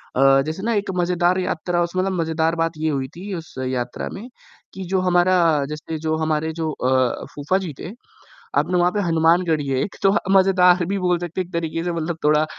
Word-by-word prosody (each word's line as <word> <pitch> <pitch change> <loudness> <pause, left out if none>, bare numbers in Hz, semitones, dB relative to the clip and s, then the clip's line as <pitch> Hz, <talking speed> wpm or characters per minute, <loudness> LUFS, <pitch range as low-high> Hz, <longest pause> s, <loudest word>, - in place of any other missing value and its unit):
अ, 135 +1 +5
जैसे 160 +5 -5
ना 230 +1 0
एक 205 -1 -1
मज़ेदार 175 +1 +2
यात्रा 175 -1 -1
उस 170 +1 -5
मतलब 190 +1 +1
मज़ेदार 160 0 0
बात 165 0 0
ये 155 +1 -1
हुई 135 -2 -2
थी 195 +3 -7
उस 165 -2 -9
यात्रा 125 -1 -3
में 215 +5 -8 0.5
कि 190 - -6
जो 190 - +2
हमारा 180 0 +3 0.3
जैसे 155 +1 -5
जो 155 0 -1
हमारे 160 0 -1
जो 160 -1 -2
अ, 130 -2 0
फूफा 145 +6 0
जी 175 -6 -5
थे 175 - -6 0.7
आपने 180 - +1
वहाँ 175 +1 +3
पे 205 - -1
हनुमान 165 0 +3
गढ़ी 155 -4 0
है 130 -1 0
एक 200 - -5
तो 195 - +5
ह - - +3 0.2
मज़ेदार 180 -2 +4
भी 195 +2 -1
बोल 180 -1 +1
सकते 175 +1 -4
हैं 180 - -2
एक 180 - -21
तरीके 165 0 -2
से 175 - -1
मतलब 165 0 -3
थोड़ा 150 +1 +4
170 Hz, 220 wpm, -21 LUFS, 155-180 Hz, 0.7 s, अ